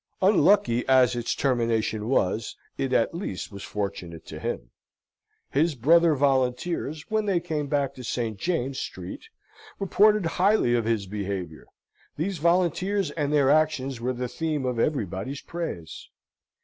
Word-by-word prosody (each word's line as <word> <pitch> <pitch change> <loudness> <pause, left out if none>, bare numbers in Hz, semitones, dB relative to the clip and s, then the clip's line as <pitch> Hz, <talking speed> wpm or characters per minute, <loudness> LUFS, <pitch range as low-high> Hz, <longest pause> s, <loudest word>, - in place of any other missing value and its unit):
Unlucky 195 - +4
as 130 -2 +5
its 120 -1 -1
termination 115 -4 0
was, 110 -3 0 0.2
it 135 -1 -2
at 120 +1 +2
least 165 - -5
was 100 -1 -9
fortunate 90 -5 -5
to - - -8
him. - - -4 0.8
His 155 +2 +2
brother 165 +6 +4
volunteers, 140 +3 0
when 215 -1 +1
they 190 -3 +2
came 155 -4 -3
back 140 -1 0
to 130 - -10
St. 115 -4 -3
James's 135 - -1
Street, - - -8 0.5
reported 205 0 +3
highly 180 - +2
of 120 -2 +1
his 110 -3 0
behaviour. 95 -5 -5 0.5
These 175 +3 -2
volunteers 180 +2 +1
and 145 -2 -2
their 140 -2 +4
actions 140 -5 +1
were 125 +2 -1
the 125 0 -3
theme 155 0 -2
of 125 -2 -1
everybody's 115 - -2
praise. 160 - -6
135 Hz, 140 wpm, -26 LUFS, 115-165 Hz, 0.8 s, as